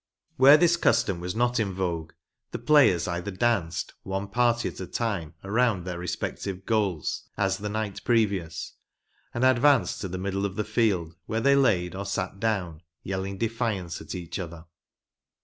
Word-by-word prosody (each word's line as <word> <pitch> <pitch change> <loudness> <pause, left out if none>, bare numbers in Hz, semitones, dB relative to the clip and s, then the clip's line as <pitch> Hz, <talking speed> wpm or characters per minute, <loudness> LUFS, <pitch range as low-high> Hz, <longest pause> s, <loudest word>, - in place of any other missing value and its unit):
Where 140 +3 +8
this 170 +1 +4
custom 110 - +2
was 90 +2 -4
not 120 +1 +1
in 100 -4 -1
vogue, 85 -4 -3 0.4
the - - -4
players 135 - +4
either 90 +3 -3
danced, 100 -5 -1
one 95 +1 -4
party 120 +2 +2
at - - -7
a 95 - -5
time, 95 -9 -3
around 105 -1 +1
their 90 -2 -4
respective 95 +2 -4
goals, 100 -9 -1
as 95 -1 +1
the 105 +1 -4
night 110 -1 -3
previous, 100 -8 0 0.6
and 120 +2 0
advanced 130 +3 +3
to 95 - -3
the 95 0 -5
middle 100 +1 -2
of 100 -1 -2
the 105 - -1
field 105 -7 0
where 110 - -1
they 140 +3 +4
laid 95 -10 +2
or 100 +1 -5
sat 100 0 -3
down, 95 -8 -1 0.2
yelling 95 +1 -3
defiance 110 -6 -2
at 80 +2 -7
each 85 -1 -5
other. 85 -2 -7
100 Hz, 165 wpm, -26 LUFS, 90-115 Hz, 0.6 s, Where